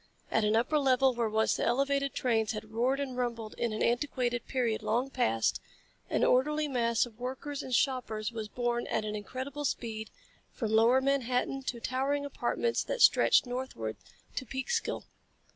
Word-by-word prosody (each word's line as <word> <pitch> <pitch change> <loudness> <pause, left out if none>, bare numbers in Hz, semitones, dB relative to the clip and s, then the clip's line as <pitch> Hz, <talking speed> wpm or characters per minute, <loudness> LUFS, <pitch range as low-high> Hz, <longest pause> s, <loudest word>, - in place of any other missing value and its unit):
At 220 - +2
an 210 +1 +3
upper 275 +7 +2
level 265 -1 +4
where 235 -2 0
once 220 +1 +2
the - - -1
elevated 275 +3 +1
trains 225 -3 +1
had 215 0 -7
roared 250 +5 +1
and 270 -3 -3
rumbled 235 -3 -3
in 235 - 0
an 215 - -1
antiquated 245 -1 0
period 240 -5 0
long 245 +5 0
past, 110 - +1 0.5
an - - +1
orderly 300 +4 +3
mass 235 -4 +1
of 230 -1 -15
workers 265 +3 -4
and 260 - -8
shoppers 235 -4 0
was 220 -2 -5
borne 240 +1 -1
at 215 - -1
an 210 0 -3
incredible 260 +7 -5
speed 220 -5 -3 0.4
from 225 -3 -3
lower 230 +4 +5
Manhattan 270 -1 0
to 240 - -3
towering 275 +4 -1
apartments 465 +10 -1
that - - +1
stretched - - +6
northward 245 - -4 0.4
to - - 0
Peekskill. 270 - -2
245 Hz, 165 wpm, -30 LUFS, 225-270 Hz, 0.5 s, stretched